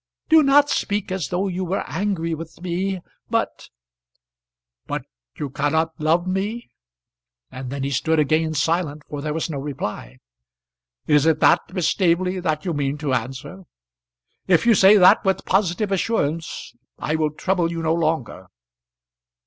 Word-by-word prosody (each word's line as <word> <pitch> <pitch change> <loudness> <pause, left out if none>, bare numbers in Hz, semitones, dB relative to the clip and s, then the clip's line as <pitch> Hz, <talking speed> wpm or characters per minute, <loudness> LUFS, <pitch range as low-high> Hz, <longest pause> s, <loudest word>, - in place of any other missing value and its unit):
Do 320 0 +7
not 285 0 +4
speak 205 -1 -1
as 185 -6 -2
though 185 +3 -1
you 185 0 -3
were 185 +2 -2
angry 165 0 -2
with 165 +1 -8
me. 185 +2 -2 0.3
But - - -2 0.5
" - - -58
"But - - -3 0.3
you 145 -3 -4
cannot 160 +4 0
love 165 +3 +2
me?" 200 +6 -3 0.8
And 130 0 -7
then 140 +1 -4
he 140 - -2
stood 160 +4 +1
again 155 +2 +1
silent, 155 -1 -1
for 145 -1 -6
there 150 +1 -3
was 160 +1 -2
no 150 -4 -4
reply. 105 - -5 0.9
"Is 150 0 +3
it 160 -1 +3
that, - - +5
Miss 180 -3 0
Staveley, 185 0 +1
that 155 -3 -2
you 175 - -1
mean 145 -1 -1
to 145 -3 -2
answer? 135 +9 -4 0.8
If 180 -1 +3
you 235 - +6
say 200 +1 +7
that 180 -2 +6
with 190 -1 0
positive 195 +1 +1
assurance, 165 -6 -2 0.2
I 155 - -2
will 155 -1 +1
trouble 180 -2 0
you 165 -1 -4
no 160 0 +2
longer." 155 - -2
165 Hz, 155 wpm, -22 LUFS, 145-185 Hz, 0.9 s, Do